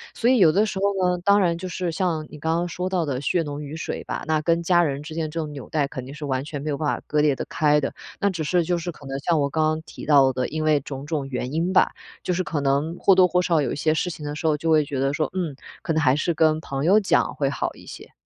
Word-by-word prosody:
所 235 Hz, -, +2 dB
以 255 Hz, -2 st, +4 dB
有 170 Hz, -5 st, +6 dB
的 205 Hz, +6 st, +3 dB
时 210 Hz, -, -4 dB
候 195 Hz, -2 st, +1 dB
呢， -, -, -6 dB
当 200 Hz, +1 st, +5 dB
然 170 Hz, -4 st, +2 dB
就 185 Hz, +2 st, -6 dB
是 180 Hz, 0 st, -2 dB
像 165 Hz, -2 st, -1 dB
你 -, -, -10 dB
刚 160 Hz, +3 st, 0 dB
刚 175 Hz, +1 st, -1 dB
说 180 Hz, +2 st, -3 dB
到 180 Hz, -3 st, 0 dB
的 135 Hz, -3 st, -3 dB
血 165 Hz, +4 st, +1 dB
浓 145 Hz, -1 st, -5 dB
于 145 Hz, +1 st, -7 dB
水 -, -, -4 dB
吧， -, -, -4 dB
那 155 Hz, -1 st, +1 dB
跟 170 Hz, +2 st, +1 dB
家 175 Hz, 0 st, +4 dB
人 140 Hz, -3 st, -2 dB
之 155 Hz, +1 st, -8 dB
间 160 Hz, -2 st, -2 dB
这 165 Hz, -, -4 dB
种 155 Hz, -2 st, -4 dB
纽 140 Hz, -3 st, -9 dB
带 150 Hz, -3 st, 0 dB
肯 130 Hz, -2 st, -7 dB
定 135 Hz, -, -9 dB
是 150 Hz, 0 st, -7 dB
完 130 Hz, -2 st, -1 dB
全 145 Hz, -2 st, -6 dB
没 155 Hz, -, -4 dB
有 145 Hz, -, -1 dB
办 155 Hz, -, -2 dB
法 -, -, -11 dB
割 150 Hz, 0 st, +1 dB
裂 150 Hz, -1 st, +3 dB
得 -, -, -5 dB
开 150 Hz, -1 st, +2 dB
的。 135 Hz, -, -2 dB, 0.3 s
那 200 Hz, -, +2 dB
只 175 Hz, -5 st, -3 dB
是 175 Hz, +3 st, +2 dB
就 175 Hz, +1 st, 0 dB
是 170 Hz, +1 st, -4 dB
可 150 Hz, -, -15 dB
能 135 Hz, 0 st, -3 dB
像 160 Hz, +3 st, +1 dB
我 140 Hz, -1 st, +1 dB
刚 155 Hz, +2 st, 0 dB
刚 155 Hz, 0 st, 0 dB
提 -, -, -10 dB
到 140 Hz, -3 st, +5 dB
的， 125 Hz, 0 st, -1 dB
因 155 Hz, +1 st, -3 dB
为 150 Hz, -2 st, +3 dB
种 135 Hz, 0 st, -7 dB
种 145 Hz, -2 st, -2 dB
原 125 Hz, 0 st, -4 dB
因 165 Hz, +3 st, 0 dB
吧， -, -, +4 dB, 0.3 s
就 180 Hz, -, 0 dB
是 185 Hz, +1 st, 0 dB
可 160 Hz, -4 st, -2 dB
能 140 Hz, +5 st, 0 dB
或 195 Hz, -, +5 dB
多 185 Hz, -1 st, +6 dB
或 180 Hz, +1 st, +2 dB
少 170 Hz, -3 st, +2 dB
有 135 Hz, -, -1 dB
一 -, -, -2 dB
些 155 Hz, +2 st, +2 dB
事 170 Hz, +3 st, -1 dB
情 155 Hz, -3 st, -7 dB
的 145 Hz, 0 st, -4 dB
时 155 Hz, -, -6 dB
候 150 Hz, -1 st, +2 dB
就 165 Hz, +2 st, -2 dB
会 155 Hz, -1 st, +5 dB
觉 140 Hz, -2 st, -4 dB
得 135 Hz, +1 st, +1 dB
说， 150 Hz, -1 st, -1 dB
嗯， 175 Hz, -6 st, -2 dB, 0.3 s
可 165 Hz, -, -2 dB
能 160 Hz, -, +1 dB
还 130 Hz, -3 st, +4 dB
是 155 Hz, +3 st, 0 dB
跟 155 Hz, -1 st, +3 dB
朋 135 Hz, -3 st, -4 dB
友 195 Hz, +5 st, +6 dB
讲 200 Hz, -, +1 dB
会 -, -, 0 dB
好 -, -, -3 dB
一 -, -, -15 dB
些。 -, -, -11 dB
155 Hz, 335 characters per minute, -23 LUFS, 145-175 Hz, 0.3 s, 有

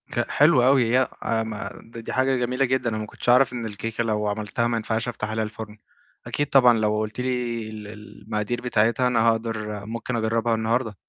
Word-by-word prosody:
ك 120 Hz, -, -2 dB
حلو 145 Hz, -4 st, +5 dB
أوي، 130 Hz, -1 st, +5 dB
هي -, -, +5 dB
ي -, -, +1 dB, 0.2 s
أ 115 Hz, -1 st, 0 dB
ما 110 Hz, -2 st, -6 dB
دي 115 Hz, 0 st, -10 dB
دي -, -, -6 dB
حاجة 130 Hz, +1 st, +2 dB
جميلة 125 Hz, +2 st, 0 dB
جدًا، 130 Hz, -1 st, 0 dB
أنا 110 Hz, -, -3 dB
ما 110 Hz, -, -3 dB
كنتش 105 Hz, -, -5 dB
أعرف 125 Hz, +1 st, +5 dB
إن 120 Hz, -2 st, -4 dB
الكيكة 110 Hz, +2 st, -3 dB
لو 105 Hz, -2 st, -1 dB
عملتها 105 Hz, +2 st, -1 dB
ما 120 Hz, -1 st, 0 dB
ينفعش 110 Hz, +1 st, -2 dB
أفتح 110 Hz, -3 st, -4 dB
عليها 110 Hz, 0 st, -1 dB
الفُرن، 110 Hz, 0 st, -7 dB, 0.5 s
أكيد 145 Hz, -, -1 dB
طبعًا 125 Hz, -4 st, +6 dB
لو 105 Hz, 0 st, +1 dB
قُلتِ 110 Hz, +2 st, -3 dB
لي 120 Hz, -3 st, -2 dB
ال 105 Hz, -1 st, -8 dB
ال 105 Hz, 0 st, -12 dB
المقادير 105 Hz, +3 st, -3 dB
بتاعتها 120 Hz, +1 st, +2 dB
أنا 125 Hz, -2 st, +2 dB
هاقدر 110 Hz, -2 st, -3 dB
ممكن 115 Hz, +3 st, -4 dB
أجرّبها 115 Hz, 0 st, +1 dB
النهارده. 110 Hz, 0 st, -1 dB
115 Hz, 210 wpm, -24 LUFS, 110-125 Hz, 0.5 s, طبعًا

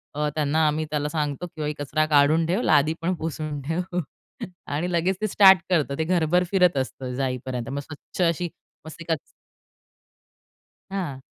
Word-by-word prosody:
अ, 150 Hz, 0 st, 0 dB
त्यांना 155 Hz, +1 st, +2 dB
आम्ही 155 Hz, +1 st, 0 dB
त्याला 150 Hz, -1 st, -1 dB
सांगतो, 150 Hz, +1 st, -2 dB
की 155 Hz, -3 st, -4 dB
कचरा 155 Hz, +2 st, 0 dB
काढून 155 Hz, +2 st, +4 dB
ठेव. 185 Hz, +7 st, 0 dB
लादी 150 Hz, -, +3 dB
पण 180 Hz, +3 st, 0 dB
पुसून 155 Hz, -2 st, -4 dB
ठेव 175 Hz, +5 st, -2 dB, 0.7 s
आणि 155 Hz, +5 st, -2 dB
लगेच 175 Hz, +2 st, +1 dB
ते 215 Hz, -, +1 dB
स्टार्ट 190 Hz, -2 st, +7 dB
करतं 150 Hz, -6 st, +1 dB
ते 160 Hz, -, 0 dB
घरभर 175 Hz, +1 st, +2 dB
फिरत 180 Hz, -6 st, +4 dB
असतं 130 Hz, -1 st, -3 dB
जाईपर्यंत 125 Hz, -2 st, -3 dB
मग 140 Hz, +1 st, -3 dB
स्वच्छ 155 Hz, +5 st, -8 dB
अशी 170 Hz, +1 st, -1 dB, 0.4 s
मस्त 160 Hz, +1 st, -10 dB
एकच 165 Hz, -2 st, -1 dB, 1.7 s
हां. 175 Hz, -9 st, -4 dB
155 Hz, 155 wpm, -24 LUFS, 145-175 Hz, 1.7 s, स्टार्ट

